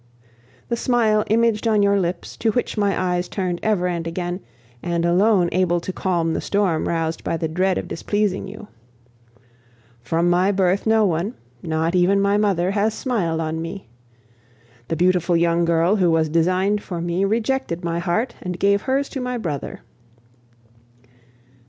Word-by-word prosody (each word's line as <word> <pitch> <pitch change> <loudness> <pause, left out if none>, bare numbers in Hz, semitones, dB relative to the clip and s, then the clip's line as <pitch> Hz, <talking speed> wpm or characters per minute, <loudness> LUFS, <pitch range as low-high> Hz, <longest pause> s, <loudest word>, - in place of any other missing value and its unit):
The 235 - +1
smile 230 -3 +2
imaged 230 0 +2
on 215 -2 +3
your 200 0 +3
lips, 180 -1 -3
to 230 - +1
which 245 - -1
my 205 -2 +1
eyes 180 -1 -1
turned 180 -3 -2
ever 210 -5 +1
and 170 -2 -3
again, 175 +1 -3 0.4
and 170 -1 -1
alone 185 +1 +3
able 175 -1 +1
to 185 +2 -6
calm 170 -4 0
the - - -2
storm 195 -6 0
roused 165 -1 -2
by 165 - -1
the 160 - -2
dread 185 +3 0
of - - -4
displeasing 205 +2 -1
you. 205 +1 -10 1.3
From 165 +8 0
my 180 +3 +3
birth 190 +1 +1
no 220 -1 +4
one, 180 +5 -1 0.3
not 160 +1 -1
even 185 +2 +3
my 200 +1 +2
mother, 195 -3 +1
has 210 +2 0
smiled 175 -11 -1
on 160 0 -3
me. 165 - -7 1.0
The 165 - -1
beautiful 175 0 +2
young 170 0 +2
girl 170 +4 +2
who 180 -3 +3
was 160 -1 +2
designed 185 +6 +1
for 175 -4 -6
me 175 +2 -1
rejected 220 -3 -1
my 170 0 -1
heart 215 +8 -1
and 180 -1 -4
gave 200 +1 +3
hers 275 +3 0
to 270 - -5
my 250 0 -2
brother. 155 - -5
185 Hz, 165 wpm, -21 LUFS, 170-210 Hz, 1.3 s, no